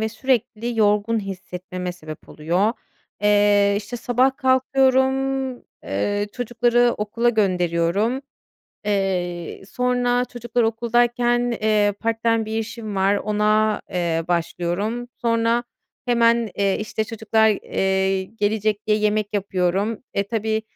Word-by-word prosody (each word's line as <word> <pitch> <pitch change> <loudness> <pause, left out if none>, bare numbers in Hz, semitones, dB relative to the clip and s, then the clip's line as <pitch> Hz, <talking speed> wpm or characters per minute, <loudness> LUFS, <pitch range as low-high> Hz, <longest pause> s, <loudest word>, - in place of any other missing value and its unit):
ve 220 - 0
sürekli 235 -1 -1
yorgun 210 +2 +2
hissetmeme 185 -2 -6
sebep 155 -3 -11
oluyor. 175 +8 0 0.5
Eee, 205 -1 +4
işte, 210 +4 -5
sabah 250 +3 +1
kalkıyorum, 265 0 +2 0.3
eee, 205 - -1
çocukları 240 0 +2
okula 220 +3 0
gönderiyorum. 195 +3 +1 0.6
Eee, 180 -4 -2
sonra 245 0 +1
çocuklar 240 -1 -2
okuldayken, 240 +1 +1
eee, 210 -1 +3
part-time 230 0 +1
bir 220 +1 -3
işim 220 -2 -5
var; 195 +1 +3
ona, 215 +1 +1
eee, 170 -2 -1
başlıyorum. 180 +7 -2
Sonra 230 +1 +1 0.4
hemen, 235 -2 +3
eee, 200 -1 +1
işte, 215 0 -2
çocuklar, 220 0 +1
eee, 190 -1 0
gelecek 210 +1 -1
diye 210 -1 +3
yemek 210 0 +1
yapıyorum. 195 +2 -1
E, 200 - +2
tabii 220 0 -1
215 Hz, 110 wpm, -22 LUFS, 195-240 Hz, 0.6 s, Eee